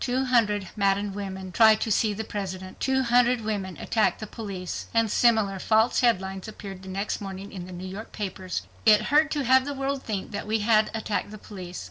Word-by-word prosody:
"Two 255 +1 0
hundred 210 -6 +2
maddened 200 0 +1
women 190 -2 -6
try 220 +3 +6
to 220 +1 -3
see 215 +1 +2
the 210 +2 -4
President"... 190 -3 -6
"Two 265 0 +1
hundred 245 0 +3
women 200 -4 -3
attack 220 -2 +1
the 215 - -6
police," 195 -5 -6
and 225 -2 +3
similar 220 -5 +3
false 220 +4 +3
headlines, 190 -5 0
appeared 195 -3 -8
the 190 - -10
next 195 +3 -3
morning 195 0 -7
in 185 -3 -7
the - - -10
New 180 +1 -7
York 200 +4 -8
papers. 190 -3 -4 0.2
It 215 -1 +6
hurt 310 +1 +5
to 295 -2 -1
have 260 +1 +5
the 285 +1 -4
world 275 0 -2
think 205 -6 -4
that 205 0 -5
we 220 0 0
had 215 0 +3
attacked 215 -2 -2
the 215 - -9
police. 185 -4 -8
210 Hz, 205 wpm, -26 LUFS, 190-230 Hz, 0.2 s, try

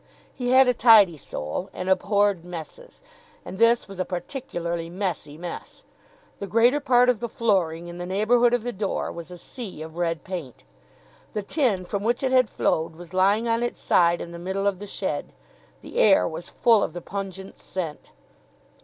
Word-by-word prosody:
He 245 -1 -3
had 260 +1 +6
a 250 - +4
tidy 215 -7 +6
soul 135 - -5
and 185 - -5
abhorred 200 -1 +2
messes. 180 - -10 0.4
And 190 - -8
this 230 +1 +4
was 195 -2 -10
a - - +2
particularly 175 - -4
messy 175 -5 -4
mess. 175 0 -8 0.6
The 200 - -5
greater 235 +8 +4
part 250 -3 +4
of 250 -4 +2
the 235 0 -4
flooring 180 -8 0
in 175 0 -8
the 175 - -5
neighbourhood 230 +5 +3
of 240 - -3
the 245 - -2
door 200 0 -2
was 170 0 -8
a 180 - -9
sea 195 - -8
of 160 +1 -10
red 165 -2 -1
paint. 175 -10 -7 0.7
The 210 - -3
tin 205 - 0
from 200 +2 -3
which 240 +4 0
it 260 - +1
had 255 -3 +4
flowed 160 0 0
was 175 +1 -12
lying 200 +5 +3
on 230 0 +1
its 240 - -3
side 170 0 +3
in 170 - -7
the 170 - -8
middle 190 +3 -3
of 200 -2 0
the 205 - -7
shed. - - -4 0.5
The - - -9
air - - +5
was - - -7
full 230 -4 +3
of 160 - -2
the 175 - -6
pungent 195 0 -7
scent. 165 -5 -6
195 Hz, 190 wpm, -24 LUFS, 175-230 Hz, 0.7 s, had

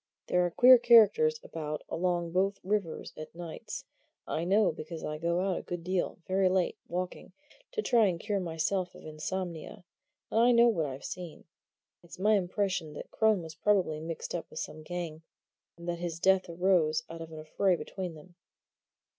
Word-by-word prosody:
There 180 - +2
are 175 - +1
queer 250 +8 +8
characters 240 - +6
about 150 - -5
along 175 -1 -1
both 195 +3 +1
rivers 195 -4 -2
at 155 +1 -9
nights 170 -2 -7 0.4
I 165 - -2
know, 200 +3 +4
because 160 +1 -7
I 150 0 -4
go 170 +2 0
out 190 -1 0
a - - -7
good 175 -1 -6
deal, 185 0 -1
very 190 0 +2
late, 185 -1 +1
walking, 180 +1 -5 0.4
to 435 - -1
try 230 -3 +4
and 175 -3 -1
cure 205 0 -1
myself 175 +2 -1
of - - -13
insomnia; 170 +4 -5 0.5
and 225 - +2
I 240 +1 +6
know 235 0 +6
what 165 -9 0
I've 135 0 -7
seen. 175 -4 -7 0.6
It's 170 - -13
my 210 +4 +3
impression 185 -4 0
that - - -9
Crone 220 -5 +2
was 160 -1 -8
probably 185 -7 +1
mixed 165 +1 -5
up 170 - -4
with - - -12
some 155 0 -5
gang, 165 -1 -5 0.6
and 170 0 -10
that 170 -1 -2
his 170 -1 -4
death 190 0 +3
arose 170 -3 +2
out 165 0 -8
of 165 0 -8
an 160 - -8
affray 175 +4 +1
between 180 -1 -6
them." 165 +4 -15
175 Hz, 180 wpm, -30 LUFS, 165-195 Hz, 0.6 s, queer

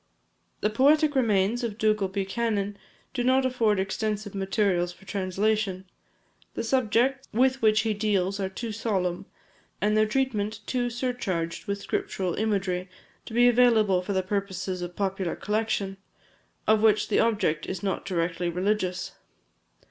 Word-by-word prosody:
The 210 - +1
poetic 290 +6 +4
remains 230 -2 +2
of 220 -3 -3
Dougal 215 -3 +2
Buchanan 200 +1 -1 0.4
do 250 -2 -1
not 260 +1 +3
afford 230 -6 +2
extensive 205 +1 -2
materials 195 -2 0
for 195 - -17
translation. 195 0 -1 0.7
The - - -2
subjects 255 +2 +1
with 260 +3 +2
which 215 -1 +4
he 220 -1 0
deals 200 -2 0
are 190 -1 -1
too 225 +4 -5
solemn, 195 -5 -2 0.5
and 210 +1 +2
their 215 0 +4
treatment 220 -3 -1
too 245 -1 -1
surcharged 230 -9 -3
with 200 0 -3
scriptural 185 -3 -2
imagery, 190 -4 -1 0.4
to - - -8
be 245 +1 +6
available 225 -6 +4
for 200 +2 -3
the 190 -1 +1
purposes 190 -1 -3
of 175 - -3
a - - -22
popular 190 -3 -1
collection, 210 -2 -1 0.7
of 220 0 +4
which 215 -1 +3
the - - +3
object 200 -9 +1
is 185 -1 -5
not 195 - -1
directly 175 -1 -1
religious. 185 0 -1
210 Hz, 145 wpm, -27 LUFS, 190-225 Hz, 0.7 s, be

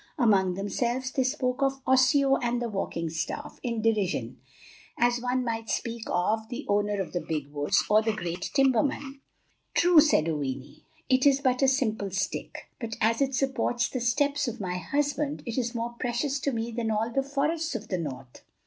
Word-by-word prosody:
Among 195 -8 +3
themselves 240 +6 -1
they 265 - +1
spoke 255 -1 -1
of 270 0 +1
"Osseo 265 +1 +4
of 240 0 -1
the 240 -1 -2
walking 195 -5 -3
staff," 160 -1 -4
in 235 -3 -2
derision, 190 - 0 0.6
as 240 0 +2
one 250 +1 0
might 225 -2 -3
speak 230 -1 -3
of 220 +5 0
"the 260 +4 -5
owner 205 0 +1
of 190 - -4
the 175 - -1
big 150 -3 -3
woods," 145 0 +2
or 215 +1 +5
"the 220 0 +1
great 175 -4 -4
timberman." 275 +1 +1 0.5
"True," 350 -2 +6
said 290 - +4
Oweenee, 140 -3 -4 0.2
"it 260 +1 +4
is 275 -1 +5
but 255 -2 +1
a 270 - +5
simple 220 -7 +1
stick; 190 0 -4
but 230 -3 -4
as 230 +3 +2
it 270 -1 +1
supports 245 -3 0
the 255 - -3
steps 285 +4 +1
of 240 0 -4
my 180 -3 -3
husband, 290 - -1
it 235 -2 -4
is 240 0 -2
more 235 +1 -3
precious 260 +3 -1
to 280 - -1
me 230 -1 -3
than 230 -1 -2
all 220 +2 0
the 270 - +1
forests 295 +3 -1
of 220 -1 -5
the 185 - -1
north." 130 -5 -7
235 Hz, 185 wpm, -27 LUFS, 205-270 Hz, 0.6 s, True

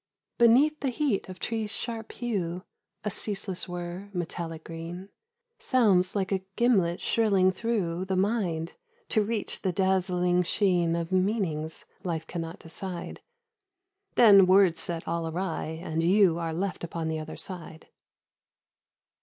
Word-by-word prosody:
Beneath 265 +7 +5
the 275 - -1
heat 255 -7 -1
of 185 - -8
trees' 220 -2 -2
sharp 225 -1 -2
hue 185 -7 -3 0.2
— - - -54
A 210 - 0
ceaseless 195 -2 -3
whirr, 175 +3 -6
metallic 165 -2 -4
green, 170 +3 -7 0.5
Sounds 200 -8 +3
like 195 -1 -1
a 190 -1 +1
gimlet 195 -8 +2
shrilling 195 -5 +3
through 185 -4 -2
The 190 0 -1
mind, 185 -5 0 0.4
to 215 - +3
reach 215 0 -3
the 190 - 0
dazzling 180 -1 +2
sheen 175 -2 +2
Of 170 0 -3
meanings 185 -5 -1 0.2
life 165 -3 -3
can 170 +1 -5
not 165 +1 -6
decide: 175 +2 -6 0.9
Then 200 -5 +8
words 185 -3 +5
set 170 -1 -2
all 165 0 -1
awry, 170 +1 -3 0.2
and 160 -2 -1
you 180 -1 +4
Are 165 -1 -2
left 185 +3 -3
upon 165 -1 -4
the 160 0 -2
other 155 - -7
side. 170 -4 -8
185 Hz, 140 wpm, -28 LUFS, 170-205 Hz, 0.9 s, Then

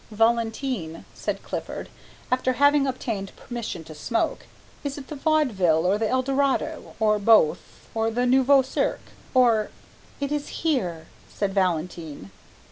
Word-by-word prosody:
"Valentine," 225 - 0
said - - -4
Clifford, - - -5 0.4
after 255 0 +2
having 285 +1 +4
obtained 225 -6 -4
permission 230 -8 -6
to 155 - -10
smoke, 225 +10 -2 0.4
"is 285 -1 -3
it 270 -2 -9
the 305 - -5
Vaudeville 225 - +2
or 195 +3 +2
the 220 -1 0
Eldorado 275 +4 0
or 215 -1 +3
both, 205 -6 +3
or 225 0 +1
the 245 +2 0
Nouveau 265 +2 +5
Cirque, 260 - -2 0.2
or 230 -4 +4 0.3
" - - -27
"It 280 0 -2
is 295 -1 -2 0.2
here," 185 - 0 0.3
said 200 -2 -2
Valentine. 165 - -2
230 Hz, 135 wpm, -25 LUFS, 195-270 Hz, 0.4 s, Nouveau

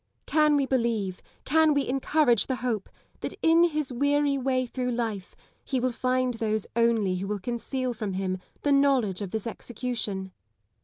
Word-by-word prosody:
Can 305 -1 +3
we 280 -1 +2
believe, 230 -8 -1 0.2
can 315 +1 +4
we 285 - +1
encourage 270 -2 +2
the 260 - 0
hope, 220 -5 -1 0.3
that - - -5
in 330 +1 +6
his 305 -5 -2
weary 285 +2 +2
way 260 -1 0
through 250 +1 -3
life 225 -5 -3 0.3
he 265 - -1
will 255 +1 0
find 255 +1 0
those 220 -2 -1
only 225 -5 +2
who 195 +2 -4
will 210 0 -1
conceal 245 +4 -3
from 215 -4 -4
him 185 0 -2 0.2
the 290 - +2
knowledge 270 -9 +3
of 200 - -3
this 220 +1 -3
execution 225 -5 -4
245 Hz, 165 wpm, -27 LUFS, 215-275 Hz, 0.3 s, in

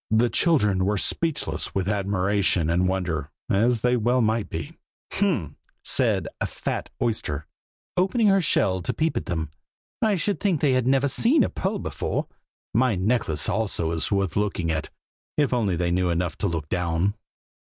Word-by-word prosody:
The 115 +2 +3
children 105 - +3
were 105 +2 +1
speechless 160 - -1
with 95 -1 0
admiration 100 -4 +1
and 90 +2 +2
wonder, 90 -5 -1 0.2
as 115 +3 +3
they 125 +1 +3
well 120 +2 +2
might 110 -2 +1
be. 80 -3 -5 0.4
"H'm!" 140 - 0 0.3
said - - +1
a - - 0
fat - - -4
oyster, 80 -10 -1 0.5
opening 195 +6 +2
her 195 -1 +5
shell 95 - +1
to - - -2
peep 160 0 0
at - - -3
them, 80 -4 -2 0.5
"I 215 -2 +3
should 195 +3 0
think 190 -7 +1
they 140 -2 +3
had 130 -1 +1
never 135 +1 +3
seen 240 - +3
a - - 0
pearl 195 +3 -2
before. - - -3 0.5
My 120 0 +3
necklace 95 -7 0
also 100 -6 -1
is 80 -2 -1
worth 100 -4 0
looking 95 -5 0
at, 80 -1 -2 0.5
if 145 -3 +2
they - - +2
only 90 -6 0
knew 90 0 +1
enough 85 -1 -1
to 100 - +1
look 80 -4 -3
down." 90 +2 0
100 Hz, 170 wpm, -25 LUFS, 90-130 Hz, 0.5 s, her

